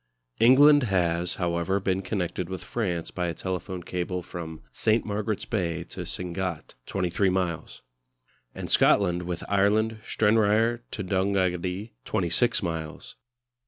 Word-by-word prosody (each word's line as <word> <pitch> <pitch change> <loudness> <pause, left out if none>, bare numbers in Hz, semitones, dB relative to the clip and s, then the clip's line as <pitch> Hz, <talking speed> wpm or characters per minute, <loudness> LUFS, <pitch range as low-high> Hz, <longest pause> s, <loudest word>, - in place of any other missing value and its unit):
England 145 +5 +7
has, 90 -5 0
however, 85 +2 0
been 95 0 0
connected 90 -2 -3
with 95 -1 -5
France 90 -8 -3
by 90 -1 -2
a 85 - -3
telephone 95 -1 -4
cable 90 0 -3
from 80 -2 -8
St. 110 +1 +1
Margaret's 105 0 -2
Bay 85 -6 -2
to - - -6
Sangatte, 90 -2 -4
23 95 +1 0
miles; 90 -8 -2 0.7
and - - -5
Scotland 90 -3 +4
with 90 -1 -4
Ireland, 110 +3 +2
Stranraer 110 +2 +2
to 105 - -4
Donaghadee, 95 +1 0
26 95 +7 +2
miles. 80 -3 -5
95 Hz, 125 wpm, -26 LUFS, 85-105 Hz, 0.7 s, England